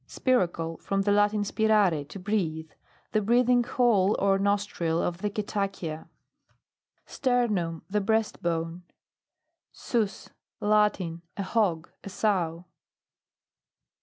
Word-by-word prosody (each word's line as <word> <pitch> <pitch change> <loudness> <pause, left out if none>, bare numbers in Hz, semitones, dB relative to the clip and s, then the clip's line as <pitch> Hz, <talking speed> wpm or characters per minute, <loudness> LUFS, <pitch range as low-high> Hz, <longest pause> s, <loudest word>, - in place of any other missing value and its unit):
SPIRACLE. 170 -10 0
From 195 0 -1
the 205 - +1
Latin, 205 0 +3
spirare, 205 -7 +2
to 175 - -9
breathe. 175 -6 -2 0.4
The 215 - +2
breathing 245 +3 +3
hole 225 -5 +2
or 195 0 +2
nostril 200 -5 0
of 170 0 -2
the 210 +1 -1
cetacea. 195 -6 -4 1.0
STERNUM 210 - 0
The 210 +2 0
breast 220 +1 0
bone. 165 0 -2 0.9
Sus. 220 -5 -2 0.3
Latin. 205 -5 +1 0.2
A 200 - -2
hog. 190 -5 0
a - - -7
sow. 180 -5 -1
200 Hz, 105 wpm, -27 LUFS, 170-215 Hz, 1.0 s, Latin